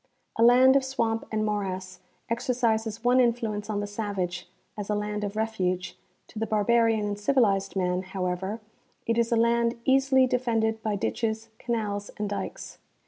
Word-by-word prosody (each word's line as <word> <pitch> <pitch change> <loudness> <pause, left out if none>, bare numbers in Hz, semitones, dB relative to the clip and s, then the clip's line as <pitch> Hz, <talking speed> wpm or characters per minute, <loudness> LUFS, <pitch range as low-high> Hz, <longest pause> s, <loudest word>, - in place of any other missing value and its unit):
A - - -1
land 250 +3 +7
of 275 - +4
swamp 230 -4 -1
and 215 -1 0
morass 190 -3 -3 0.3
exercises 230 -2 -1
one 250 +1 +4
influence 225 -4 0
on 205 -1 -1
the - - -2
savage, 200 -4 -4 0.3
as 205 -1 -6
a 210 - +1
land 210 0 -3
of 205 0 -4
refuge; 190 -5 -1 0.3
to 215 - -8
the 225 - -1
barbarian 220 +1 +2
and 205 0 -3
civilized 205 -6 +2
man, 180 -1 0
however, 190 +2 -3 0.4
it 230 0 +1
is 235 +1 +1
a - - +4
land 235 0 +2
easily 265 0 +4
defended 225 -3 0
by 215 -2 -1
ditches, 220 +2 -2
canals 210 -4 -2
and 210 -1 -3
dikes. 205 - -6
220 Hz, 160 wpm, -27 LUFS, 205-235 Hz, 0.4 s, land